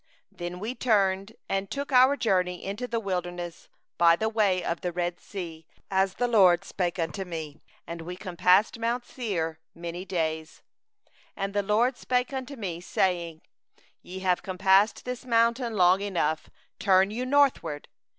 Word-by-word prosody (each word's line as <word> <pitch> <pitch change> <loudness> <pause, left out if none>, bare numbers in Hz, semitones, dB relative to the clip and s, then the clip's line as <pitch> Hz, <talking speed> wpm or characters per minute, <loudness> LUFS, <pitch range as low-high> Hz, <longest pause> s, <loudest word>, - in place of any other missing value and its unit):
Then 175 +1 -6
we 220 +6 -3
turned, 200 -4 +1
and 195 0 -2
took 280 +1 -4
our 260 +2 +6
journey 185 -6 0
into 205 +6 -4
the 235 -1 -1
wilderness 175 -4 -4 0.3
by 170 -1 +6
the 220 +5 -1
way 205 -5 +2
to 170 - -1
the 180 - -2
Red 175 0 -2
Sea, 165 -5 -8 0.2
as 190 0 +1
the 245 - 0
LORD 190 -7 +5
spoke 180 -1 -2
unto 165 +2 -2
me; 160 -4 -7 0.2
and 170 0 -7
we 175 +2 -6
compassed 185 +3 +2
mount 240 +2 -1
Seir 165 -10 -3 0.2
many 170 +1 -6
days. 160 -4 -3 0.7
2And 195 0 -3
the 205 - +2
LORD 225 +6 +1
spoke 250 +1 -1
unto 265 +1 -5
me, 180 -8 -5
saying: 175 -3 -1 0.6
3'Ye 190 +1 -8
have 180 -2 +1
compassed 190 +3 +2
this 250 +1 -5
mountain 235 -1 +2
long 180 +1 +5
enough; 170 -6 -1 0.3
turn 190 0 +4
you 240 +4 -3
northward. 255 - +1
190 Hz, 155 wpm, -27 LUFS, 175-230 Hz, 0.7 s, our